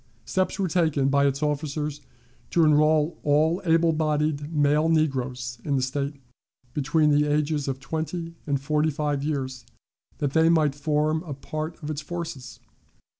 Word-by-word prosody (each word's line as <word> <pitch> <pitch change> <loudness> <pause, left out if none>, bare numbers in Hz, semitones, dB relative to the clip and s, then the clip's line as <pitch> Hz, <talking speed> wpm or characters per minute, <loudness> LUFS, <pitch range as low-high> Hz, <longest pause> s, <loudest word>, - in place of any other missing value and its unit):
Steps 185 0 0
were 195 -2 0
taken 155 -5 +1
by 140 0 +3
its 140 +2 -1
officers 150 0 -2 0.5
to 170 - +3
enroll 155 +1 +3
all 155 +5 +2
able 165 0 +3
bodied 150 -1 0
male 150 +1 +2
negroes 130 -6 -1
in 145 - 0
the 130 - +1
State 140 +2 -2 0.6
between 150 +2 +2
the 145 0 +4
ages 150 -1 0
of 135 -1 -2
twenty 160 +4 -4
and 140 -2 +1
forty 150 +2 +1
five 145 -1 -1
years, 135 -4 -3 0.5
that 145 -2 -1
they 160 0 +4
might 155 -4 +3
form 150 +2 0
a 155 -5 -6
part 155 +4 -5
of 150 - -3
its 150 0 -4
forces. 165 -5 -6
150 Hz, 155 wpm, -25 LUFS, 140-160 Hz, 0.6 s, the